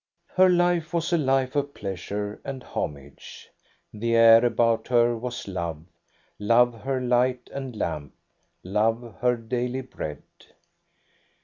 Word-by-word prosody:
Her 185 0 +6
life 175 -2 +1
was 170 +1 0
a - - +4
life 135 -2 +1
of 145 0 -1
pleasures 100 +2 -5
and 135 -2 -6
homage. 70 -1 -7 0.4
The 115 +2 -1
air 115 0 +7
about 115 -1 +2
her 120 -1 +3
was 120 0 -6
love 85 -5 -4 0.3
— - - -37
love 115 +2 +3
her 135 -1 -1
light 125 0 0
and 135 -3 -6
lamp, 75 -8 -4 0.5
love 110 +5 -1
her 125 -1 +2
daily 125 +3 -3
bread. 75 - -7
120 Hz, 130 wpm, -25 LUFS, 105-130 Hz, 0.5 s, air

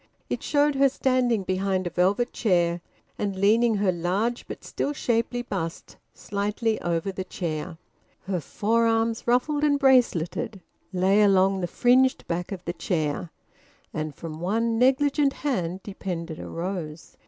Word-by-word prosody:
It - - -1
showed 290 0 +2
her 275 0 +4
standing 255 -5 +1
behind 185 0 -1
a 175 - -3
velvet 200 +7 +1
chair 175 -4 +1 0.4
and 200 -2 -1
leaning 220 +4 +3
her 200 -2 +2
large 190 +8 -1
but - - -8
still 290 - -2
shapely 245 -1 -1
bust 175 -8 -5 0.2
slightly 210 +2 -2
over 170 +2 -1
the 190 0 -4
chair. 165 -2 -4 0.4
Her 190 -2 -2
forearms, 225 - 0
ruffled 290 +5 +2
and 290 -1 +3
braceleted, 245 - +2 0.3
lay 190 +3 +3
along 195 -1 +4
the 175 - -1
fringed 255 +7 +3
back 175 +2 -3
of 185 -2 -6
the 175 - -2
chair, 165 -1 -2 0.6
and 155 -2 -4
from 160 -2 -7
one 225 +6 0
negligent 275 +2 +3
hand 185 - -2
depended 175 -5 -5
a - - -7
rose. 165 -3 -5
200 Hz, 140 wpm, -25 LUFS, 175-240 Hz, 0.6 s, her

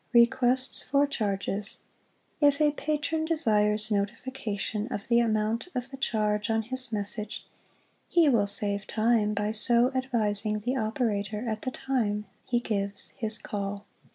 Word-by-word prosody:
Requests 250 +2 +4
for 280 +2 +2
ChargesŌĆö 205 -5 -2 0.6
If 285 -1 +4
a 300 -1 +4
patron 305 +1 -2
desires 215 -9 +2
notification 210 0 -2
of 205 -6 -5
the 235 0 +5
amount 220 +2 0
of 250 +1 -3
the 270 - -7
charge 210 -4 0
on 225 0 +1
his 255 +1 -5
message, 210 0 -4 0.6
he 340 -3 +4
will 230 -7 +3
save 200 0 +4
time 215 -1 +1
by 210 +1 0
so 235 +3 +3
advising 215 -5 0
the 245 +5 -1
operator 215 -2 -1
at 220 -1 -2
the - - -2
time 225 -6 -1 0.2
he 240 - +1
gives 200 -4 -2
his 220 -3 0
call. 200 -1 -5
220 Hz, 140 wpm, -28 LUFS, 210-255 Hz, 0.6 s, the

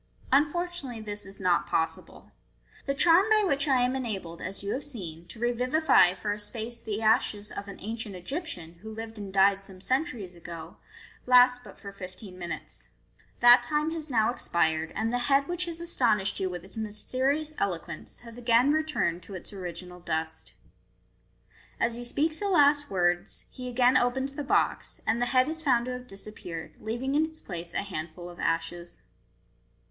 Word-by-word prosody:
Unfortunately, 295 -2 +1
this 205 -2 -7
is 195 - -12
not 180 -2 +2
possible. 160 - -2 0.5
The 275 - 0
charm 340 +7 +6
by 430 -1 +5
which 280 -5 +1
I 260 -3 +4
am 250 +1 +1
enabled, 195 -10 -4
as 195 +2 -6
you 200 - -1
have 275 - -3
seen, 175 - -6
to 225 - -11
revivify 245 - +4
for 205 +3 -2
a 205 - -3
space 230 +2 -2
the 220 0 -3
ashes 215 -2 +2
of 200 - -6
an 200 - -8
ancient 220 -1 -5
Egyptian, 180 - -6
who 220 +1 -8
lived 225 0 -6
and 200 -2 -6
died 195 0 +4
some 190 -1 -10
centuries 240 - -2
ago, 170 -1 -9 0.5
lasts 250 0 +7
but - - -13
for 200 - -9
fifteen 185 0 -10
minutes. 175 -1 -7 0.5
That 240 +1 +9
time 300 +1 0
has 320 -2 -5
now 225 -3 +3
expired, 160 -7 +1
and 225 +2 -1
the 245 - +1
head 275 0 +4
which 350 +1 -1
has 335 -1 -6
astonished 235 - +1
you 190 - 0
with 180 -1 -6
its 195 - -17
mysterious 255 +8 0
eloquence 175 -4 -2
has 235 0 -8
again 245 +4 +4
returned 305 - 0
to 190 +3 -10
its 185 - -7
original 180 -1 -7
du<t." 160 -1 -4 1.3
As 230 - +2
he 240 +1 -6
speaks 305 +6 +1
the 405 - -1
last 290 -4 +5
words, 175 -2 0
he 250 -1 -6
again 250 +1 +4
opens 265 +3 +1
the 290 - -4
box, 275 - 0
and 230 +2 +1
the 245 - +2
head 255 0 +4
is 320 +1 -3
found 245 -6 +3
to 255 - -3
have 250 0 -6
disappeared, 195 -5 -8
leaving 240 +5 -2
in 300 +2 +4
its 315 0 -5
place 170 -2 -7
a - - 0
handful 175 -1 -6
of 175 - -14
ashes. 170 - -2
225 Hz, 180 wpm, -28 LUFS, 185-270 Hz, 1.3 s, That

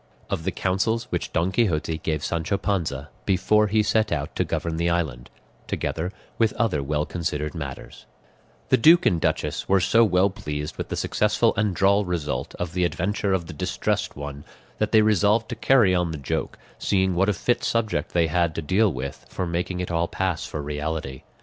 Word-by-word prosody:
OF 80 - -2
THE - - +1
COUNSELS 105 +5 0
WHICH - - -2
DON 85 +3 +1
QUIXOTE 80 -8 0
GAVE 80 -1 -2
SANCHO 85 +4 -1
PANZA 80 -8 -2 0.2
BEFORE 105 +3 +3
HE 105 +1 +2
SET 110 0 +1
OUT 70 -1 -2
TO - - +1
GOVERN 80 -1 -2
THE 85 +1 +1
ISLAND, 75 -9 -2 0.4
TOGETHER 85 +3 -2 0.3
WITH 115 -2 +3
OTHER 105 -11 0
WELL 75 +2 -1
CONSIDERED 75 -3 -3
MATTERS - - -8 0.6
The - - +5
duke 165 +8 +6
and 85 -2 +2
duchess - - -1
were 95 0 +5
so 115 +6 +4
well 95 -1 +3
pleased 75 -5 -5
with - - -5
the - - -2
successful - - +2
and 105 -3 0
droll 100 +2 +4
result 75 -8 -3
of 90 -1 -4
the 90 0 0
adventure 95 +5 0
of 90 -3 0
the 90 - -8
Distressed 75 - -2
One, 70 0 -7 0.4
that - - 0
they 110 -1 +6
resolved 105 +2 +3
to 120 - -3
carry 115 -4 +4
on 90 -1 +1
the 80 - -4
joke, 70 -3 -3 0.2
seeing 95 -1 +1
what 95 +3 +2
a - - +3
fit 120 +7 0
subject 110 -10 0
they 85 -1 +3
had 85 0 +1
to 80 - -3
deal 100 +6 +3
with 70 -1 -6
for 90 - -3
making 90 +1 -2
it 90 - -4
all 85 0 +1
pass 95 -3 -2
for 75 - -5
reality. 75 -2 -4
90 Hz, 195 wpm, -24 LUFS, 80-100 Hz, 0.6 s, duke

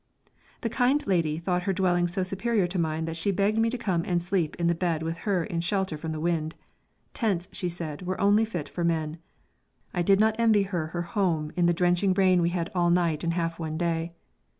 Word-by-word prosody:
The 230 - -1
kind 260 +4 +2
lady 165 -5 +1
thought 180 +2 -1
her 195 +1 -1
dwelling 175 -2 +2
so 185 +2 -1
superior 195 +2 0
to 175 +1 -2
mine 160 -1 -1
that 165 0 -4
she 165 +5 0
begged 200 +3 +1
me 225 0 +3
to 250 - -3
come 190 -8 0
and 175 -1 0
sleep 175 -2 -1
in 170 - -2
the 170 - +3
bed 165 -2 -1
with 165 +1 -3
her 185 -4 +2
in 165 0 -3
shelter 190 -1 -1
from 160 +1 -5
the 155 - -4
wind; 160 -1 -1 0.6
tents, 195 -7 -1
she 180 -3 -2
said, 165 -4 -6
were 185 +1 -3
only 205 +2 +4
fit 180 -9 -4
for 175 - -4
men. 160 -1 -1 0.7
I 175 - 0
did 195 +3 +4
not 220 0 +3
envy 220 -3 +4
her 175 -5 -2
her 175 +2 -3
home 170 -5 -1
in 175 -1 +3
the 175 - +3
drenching 180 +2 +2
rain 185 -2 +4
we 170 - +2
had 175 -1 -3
all 175 -2 +2
night 170 -3 +1
and 170 0 0
half 165 -1 -2
one 160 -1 -3
day. 170 0 -1
175 Hz, 225 wpm, -27 LUFS, 165-195 Hz, 0.7 s, only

